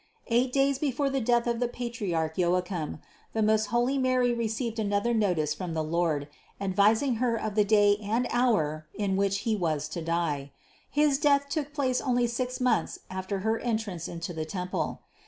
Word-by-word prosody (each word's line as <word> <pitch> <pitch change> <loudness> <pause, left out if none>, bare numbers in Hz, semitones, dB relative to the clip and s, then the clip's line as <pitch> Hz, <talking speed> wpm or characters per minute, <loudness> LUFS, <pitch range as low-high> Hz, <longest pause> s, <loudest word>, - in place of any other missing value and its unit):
Eight 245 +2 +2
days 275 0 +2
before 280 -1 0
the 270 -1 0
death 240 0 +2
of 235 -1 0
the 245 - +1
patriarch 205 -11 -3
Joachim 180 -3 -1 0.3
the 220 - +1
most 215 0 +3
holy 240 +5 +1
Mary 255 -2 +2
received 230 0 -2
another 205 +2 +1
notice 175 -9 +1
from 170 +1 -5
the 160 - 0
Lord, 155 -3 0 0.3
advising 210 +6 +2
Her 240 0 +1
of 215 -2 -3
the 210 0 +4
day 205 -1 +4
and 225 +4 0
hour 155 -12 +1
in 200 -2 0
which 195 0 +1
He 220 0 0
was 155 -6 -1
to 170 - -5
die. 160 -4 -1 0.4
His 290 -2 +2
death 280 -1 +3
took 290 0 -2
place 265 -4 0
only 245 -2 +2
six 250 +2 -2
months 250 -1 +1
after 190 +1 -3
Her 220 +2 0
entrance 220 -8 -2
into 170 +1 -5
the 160 -1 -3
temple. 180 +3 -3
215 Hz, 175 wpm, -28 LUFS, 180-245 Hz, 0.4 s, the